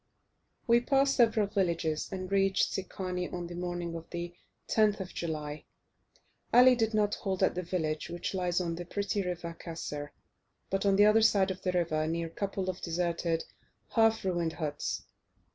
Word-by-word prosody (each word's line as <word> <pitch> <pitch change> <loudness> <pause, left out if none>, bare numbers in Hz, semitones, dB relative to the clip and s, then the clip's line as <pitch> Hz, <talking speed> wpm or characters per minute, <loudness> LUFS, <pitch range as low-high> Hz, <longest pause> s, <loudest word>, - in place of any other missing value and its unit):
We 235 -1 +5
passed 275 +2 +3
several 225 -3 +4
villages, 170 -6 -1
and 185 0 -5
reached 195 -1 +2
Secani 185 -1 -3
on 175 -1 -4
the 170 - -7
morning 175 -1 -3
of 165 0 -7
the 175 0 -5 0.3
10th 210 -2 +3
of 190 -1 -6
July. 155 -3 -4 0.9
Ali 250 +1 +8
did 225 -2 0
not 210 -1 +2
halt 190 -1 -2
at - - +3
the 180 - -2
village 160 -4 -2
which 175 +3 -4
lies 180 -2 0
on 170 -2 -1
the 175 +1 -6
pretty 200 +2 -1
river 175 -2 -4
Kasir, 150 -3 -5 0.6
but 195 +1 +1
on 195 - +4
the 205 +1 +6
other 215 +1 +6
side 200 -3 +4
of 185 - -7
the 185 - 0
river 155 -3 +1
near 165 +1 -1
a - - -6
couple 195 0 -3
of 185 0 -3
deserted, 170 -1 -1 0.4
half 225 -2 +3
ruined 175 -3 0
huts. 150 -3 -3
180 Hz, 175 wpm, -30 LUFS, 170-200 Hz, 0.9 s, Ali